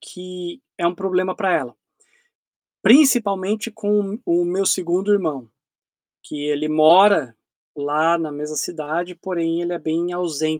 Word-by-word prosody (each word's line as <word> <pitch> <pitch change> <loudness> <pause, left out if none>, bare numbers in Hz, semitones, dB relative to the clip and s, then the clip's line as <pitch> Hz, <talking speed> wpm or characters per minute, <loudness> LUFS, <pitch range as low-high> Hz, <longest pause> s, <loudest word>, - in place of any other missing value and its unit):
que 180 +5 -9 0.2
é 170 - +1
um 175 - 0
problema 185 0 -1
para 190 -4 0
ela. 125 -5 -2 1.1
Principalmente 220 -4 +3
com 210 0 -1
o 175 +1 +1
meu 190 +3 -1
segundo 185 +3 +1
irmão, 155 - -1 0.7
que 145 -1 -7
ele 150 +1 -1
mora 155 - +5 0.4
lá 150 +4 +1
na 160 -2 -4
mesma 150 +1 -6
cidade, 170 +3 -4
porém 170 -2 -3
ele 175 0 -3
é 170 - -4
bem 170 +2 -2
ausen 155 -3 -2
175 Hz, 135 wpm, -20 LUFS, 155-190 Hz, 1.1 s, mora